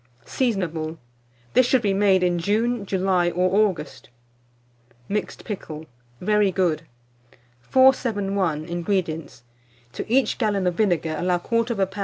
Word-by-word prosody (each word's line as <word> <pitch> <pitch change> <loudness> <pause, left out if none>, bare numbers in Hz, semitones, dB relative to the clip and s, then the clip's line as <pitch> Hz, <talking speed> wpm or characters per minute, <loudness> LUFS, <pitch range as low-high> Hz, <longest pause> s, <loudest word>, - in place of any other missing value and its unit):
Seasonable. 170 - -2 0.6
This 255 - +5
should 255 -2 +2
be 200 -2 +2
made 195 -2 +3
in 175 -1 +1
June, 215 +3 0
July, 185 -2 +1
or 185 +4 +3
August. 150 -8 -9 1.0
MIXED 210 +1 -3
PICKLE. 160 -7 -6 0.3
(Very 210 0 +2
Good.) 165 -4 0 0.7
471. 200 - +2
INGREDIENTS. 170 -6 -3 0.5
To - - -6
each 265 +1 +2
gallon 205 -5 0
of 180 - +1
vinegar 170 -5 0
allow 180 0 +1
1/4 230 +5 0
lb. 200 -4 -2
190 Hz, 120 wpm, -23 LUFS, 175-215 Hz, 1.0 s, This